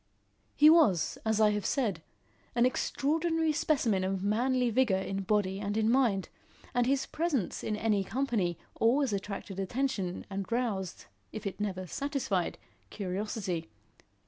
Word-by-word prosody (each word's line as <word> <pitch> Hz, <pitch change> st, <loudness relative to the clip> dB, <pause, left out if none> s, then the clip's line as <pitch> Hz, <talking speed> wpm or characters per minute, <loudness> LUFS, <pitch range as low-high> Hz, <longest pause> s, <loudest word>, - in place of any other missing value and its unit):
He 300 Hz, -, +7 dB
was, 235 Hz, -, +5 dB
as 220 Hz, -1 st, +1 dB
I 215 Hz, -1 st, +5 dB
have 210 Hz, -1 st, -1 dB
said, 215 Hz, -, 0 dB, 0.5 s
an 240 Hz, 0 st, +4 dB
extraordinary 320 Hz, +5 st, +1 dB
specimen 255 Hz, -10 st, +1 dB
of 190 Hz, 0 st, -1 dB
manly 245 Hz, +4 st, +1 dB
vigour 230 Hz, -5 st, +3 dB
in 195 Hz, +1 st, -3 dB
body 195 Hz, -1 st, 0 dB
and 205 Hz, +1 st, -2 dB
in 220 Hz, +1 st, +3 dB
mind, 235 Hz, -7 st, +2 dB, 0.5 s
and 245 Hz, 0 st, +2 dB
his 270 Hz, 0 st, +1 dB
presence 300 Hz, -, -1 dB
in 215 Hz, -, -1 dB
any 210 Hz, -2 st, +1 dB
company 210 Hz, -, -1 dB, 0.2 s
always 245 Hz, +1 st, +3 dB
attracted 195 Hz, -1 st, -4 dB
attention 195 Hz, -3 st, -2 dB
and 195 Hz, +1 st, -5 dB
roused, 215 Hz, -7 st, -2 dB, 0.3 s
if 215 Hz, -, -7 dB
it 200 Hz, -, -4 dB
never 190 Hz, -3 st, -2 dB
satisfied, 260 Hz, -, -2 dB, 0.3 s
curiosity. 190 Hz, -, -3 dB
215 Hz, 140 wpm, -30 LUFS, 195-260 Hz, 0.5 s, He